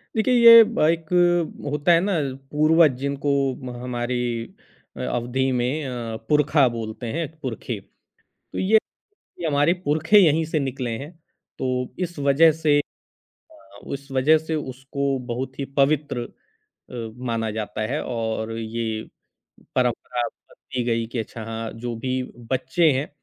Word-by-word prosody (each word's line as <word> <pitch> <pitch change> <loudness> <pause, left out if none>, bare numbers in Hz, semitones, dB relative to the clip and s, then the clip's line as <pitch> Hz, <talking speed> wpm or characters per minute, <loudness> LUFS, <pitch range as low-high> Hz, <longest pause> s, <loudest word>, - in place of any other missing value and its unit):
देखिए 225 +3 +2
ये 230 -1 +10
ब 225 +1 -4
एक 165 -1 -1 0.6
होता 150 +4 +2
है 170 - +6
ना 200 +2 0 0.4
पूर्वज 155 +1 +5
जिनको 140 +1 -1 0.5
हमारी 125 0 -2 0.9
अवधि 125 +2 -1
में 130 +5 -1
अ, 120 -3 -4
पुरखा 150 -2 +4
बोलते 115 +1 -5
हैं 165 -1 -1
पुरखे, 120 -4 -4
तो 95 - -28 0.5
ये 210 +4 +4 0.6
ये 170 - -2
हमारे 145 +2 +3
पुरखे 155 +7 +4
यहीं 160 -3 +4
से 155 0 -1
निकले 130 -3 -3
हैं। 145 +6 -8 0.5
तो 130 - -1 0.3
इस 175 -2 -3
वज़ह 140 +3 +5
से 150 -2 +4 0.5
अ, 100 +1 -19
उस 140 0 -6
वजह 140 +4 +4
से 160 0 -1 0.2
उसको 135 +1 -2 0.2
बहुत 130 +2 -5
ही 140 - -1
पवित्र 140 -3 +2 0.7
अ, 115 -3 -6
माना 115 -2 -1
जाता 105 0 -4
है 150 - -1
और 110 -2 -3
ये 115 +1 -3 0.9
परंपरा 125 0 0
बनती 125 -1 -7
गई 115 -1 0
कि 120 +1 -4
अच्छा 110 0 -6
हाँ, 115 0 -5
जो 120 +1 -5
भी 130 +3 -2 0.3
बच्चे 130 +5 +2
हैं, 135 +3 -1
135 Hz, 140 wpm, -23 LUFS, 120-155 Hz, 0.9 s, ये